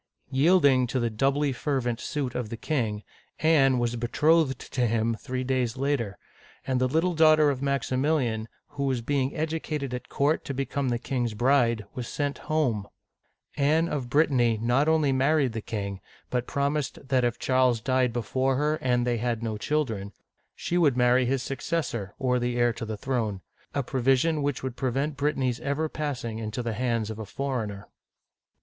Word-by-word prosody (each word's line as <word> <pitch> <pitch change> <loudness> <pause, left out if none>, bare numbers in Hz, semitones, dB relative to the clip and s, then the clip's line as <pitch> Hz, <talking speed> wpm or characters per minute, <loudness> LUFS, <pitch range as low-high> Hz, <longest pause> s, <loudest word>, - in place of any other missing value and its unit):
Yielding 140 -3 +4
to 130 +2 -1
the 120 -1 0
doubly 135 +5 +1
fervent 125 -3 -1
suit 140 -5 -3
of 120 -4 -3
the 115 - -5
king, 110 -8 -2 0.4
Anne 140 -5 +4
was 120 0 0
betrothed 150 +5 +2
to 125 -2 -1
him 115 +1 +1
three 130 +2 -4
days 125 -2 -1
later, 130 -7 -1 0.2
— - - -26
and 130 -1 0
the 130 - +3
little 165 +7 +1
daughter 155 -2 +5
of 130 -2 -4
Maximilian, 135 -4 0 0.2
who 140 -1 -3
was 130 -3 -1
being 135 +2 0
educated 155 -4 -3
at 125 0 -6
court 145 +3 +1
to 140 - -4
become 135 0 -1
the 120 - +1
king's 120 -2 -2
bride, 120 -2 +2
was 125 -2 -5
sent 145 -1 -2
home! 125 -10 +1 0.7
Anne 155 +4 +3
of 135 -7 -3
Brittany 130 -6 +3
not 120 +6 +2
only 155 -3 +3
married 135 -1 +2
the 110 - -3
king, 100 -4 -4 0.3
but 125 -1 -1
promised 140 0 -1
that 130 -2 +3
if 120 -1 0
Charles 130 -2 +2
died 130 +1 +1
before 130 +3 0
her, 150 +3 +1
and 125 -1 +1
they 120 -1 +1
had 115 0 -2
no 110 -2 -2
children, 110 -6 -2 0.4
she 175 - -1
would 145 -7 +3
marry 125 0 +4
his 130 0 0
successor, 125 - -3
or 125 -2 +1
the. 120 0 -1
heir 120 -1 +3
to 115 - -6
the 110 -1 -4
throne, 110 -5 -2 0.2
— - - -34
a 140 - +1
provision 135 +5 +2
which 145 -2 -2
would 130 -2 -4
prevent 135 +3 -1
Brittany's 135 -4 0
ever 140 +3 -1
passing 125 -8 -4
into 110 +2 -4
the 115 -1 -2
hands 115 -2 -1
of 110 - -7
a - - -4
foreigner. 110 -6 -4
130 Hz, 180 wpm, -27 LUFS, 120-145 Hz, 0.7 s, daughter